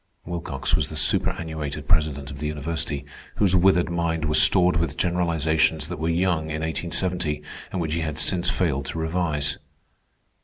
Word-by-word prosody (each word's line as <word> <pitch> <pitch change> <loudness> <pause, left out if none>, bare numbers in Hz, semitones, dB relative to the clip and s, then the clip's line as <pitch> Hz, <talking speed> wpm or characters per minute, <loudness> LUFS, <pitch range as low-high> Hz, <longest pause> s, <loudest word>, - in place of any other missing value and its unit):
Wilcox 80 -6 -2
was - - -1
the - - -7
superannuated 80 -5 0
president 75 -3 +1
of 70 - -8
the 75 - -2
university, 75 -1 -3 0.3
whose 95 -3 +2
withered 90 -1 +3
mind 85 -1 -1
was 75 0 +5
stored 90 -2 +5
with 80 -2 -2
generalizations 80 -3 +1
that - - -5
were 80 +1 -1
young 85 -1 +1
in 80 0 -3
1870, 85 -1 -2 0.3
and 95 - -3
which 80 -2 -2
he 85 - -1
had 75 -2 -3
since 90 +1 +3
failed 70 -7 -1
to 75 - -5
revise. 80 -3 -1
80 Hz, 160 wpm, -24 LUFS, 75-85 Hz, 0.3 s, was